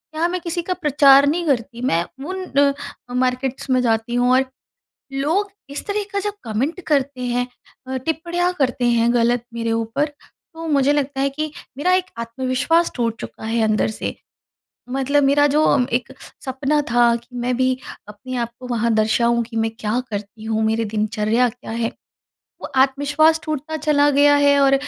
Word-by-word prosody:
यहाँ 325 +2 +1
मैं 360 0 -3
किसी 340 +1 -2
का 365 +2 -2
प्रचार 285 -4 +5
नहीं 340 +4 0
करती, 240 -3 -1
मैं 170 -9 +1 0.2
उन 375 +2 -4
अ, 280 -4 -1
मार्केट्स 255 +1 -1
में 255 -1 +3
जाती 225 0 0
हूँ 245 +1 +3
और 260 +1 +4 0.7
लोग 325 +10 0 0.2
इस 280 - -6
तरह 410 +1 -1
का 400 - +1
जब 415 +1 -2
कमेंट 250 - -2
करते 275 -3 0
हैं 245 0 -1 0.4
अ, 260 - -2
टिप्पणियाँ 340 +5 -1
करते 255 -2 +1
हैं, 235 0 +3
गलत 240 0 +2
मेरे 230 -1 -2
ऊपर, 225 +5 0 0.5
तो 325 0 -7
मुझे 285 -1 +3
लगता 280 -1 -1
है 275 - +2
कि 305 +2 -4 0.3
मेरा 360 +6 +2
एक 370 0 +2
आत्मविश्वास 260 +8 0
टूट 230 -2 -1
चुका - - -9
है 225 +1 0
अंदर 215 0 +2
से, 215 - -4 0.7
मतलब 270 +2 +1
मेरा 285 +1 +4
जो 295 +2 +2 0.3
एक 245 +2 -1 0.3
सपना 275 +3 0
था 240 0 +4
कि 235 0 -8
मैं 245 +1 0
भी 255 0 +2 0.3
अपने 250 +5 -8
आप 235 -1 -1
को 255 - -8
वहाँ 235 -1 0
दर्शाऊँ 235 +2 +2
कि 230 0 -7
मैं 225 0 +1
क्या 220 +3 0
करती 210 +1 -6
हूँ, 220 0 -1
मेरी 225 +1 +1
दिनचर्या 215 +3 +1
क्या 245 0 -10
है, 230 0 -1 0.7
वो - - -5
आत्मविश्वास 285 +4 +3
टूटता 310 0 -3
चला 295 -1 +3
गया 290 +1 +5
है 285 0 +4
और 275 0 +5
260 Hz, 175 wpm, -21 LUFS, 235-290 Hz, 0.7 s, प्रचार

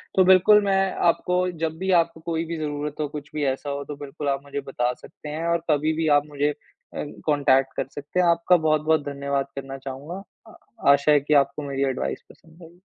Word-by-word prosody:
तो 190 - +6
बिल्कुल 190 +3 +6
मैं 195 -1 +2 0.2
आपको 180 +1 +1 0.2
जब 160 0 -2
भी 190 +2 -1
आपको 165 - -7
कोई 165 0 -3
भी 165 0 -4
ज़रूरत 150 -1 -4
हो, 150 - -1
कुछ 150 0 -8
भी 150 - -1
ऐसा 135 +2 -2
हो 140 0 -3
तो 150 - -6
बिल्कुल 145 +1 -5
आप 140 0 -1
मुझे 140 0 -4
बता 125 -3 -1
सकते 150 - -12
हैं 155 +3 -4
और 170 -1 0
कभी 155 +1 +2
भी 160 0 -1
आप 145 - -1
मुझे 145 0 0
अ, 150 0 -9 0.2
कॉन्टैक्ट 140 -3 +3
कर - - -1
सकते 145 +5 -5
हैं, 180 - +4
आपका 170 +1 +4
बहुत-बहुत 155 -1 +2
धन्यवाद 140 -1 -2
करना 135 0 -6
चाहूँगा। 140 +8 -7 0.7
आशा 140 +2 +3
है 150 - +6
कि 145 +2 -1
आपको 140 +2 -9
मेरी 140 0 -1
एडवाइस 70 - -3
पसंद 165 +1 -18
आई। 170 +2 -16
150 Hz, 210 wpm, -24 LUFS, 140-165 Hz, 0.7 s, तो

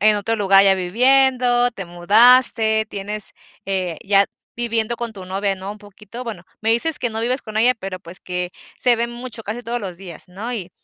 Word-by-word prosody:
en 210 +1 +4
otro 225 +3 -1
lugar 195 -2 +5
ya 195 -1 +5
viviendo, 245 +5 +3
te 195 - -7
mudaste, 220 +4 +4
tienes, 205 +1 -4 0.3
eh, 185 -4 -2
ya 200 0 +4 0.3
viviendo 230 -1 -1
con 235 -1 -5
tu 190 -3 -10
novia, 195 +1 -1
¿no? 190 +1 -7
Un 210 - -14
poquito. 210 +3 -11
Bueno, 220 -8 -7 0.2
me 220 - 0
dices 265 +8 +3
que 245 - -1
no 220 0 -3
vives 250 +3 -1
con 215 -1 -8
ella, 245 +3 +4
pero 195 -4 -7
pues 175 0 -8
que 180 -1 -3 0.3
se 245 -1 +3
ven 235 +1 -2
mucho, 240 -1 -8
casi 220 +4 -5
todos 240 +1 -3
los 190 -4 -6
días, 180 -2 -10
¿no? 210 +7 -6
Y 195 -7 -5
215 Hz, 205 wpm, -20 LUFS, 195-240 Hz, 0.3 s, lugar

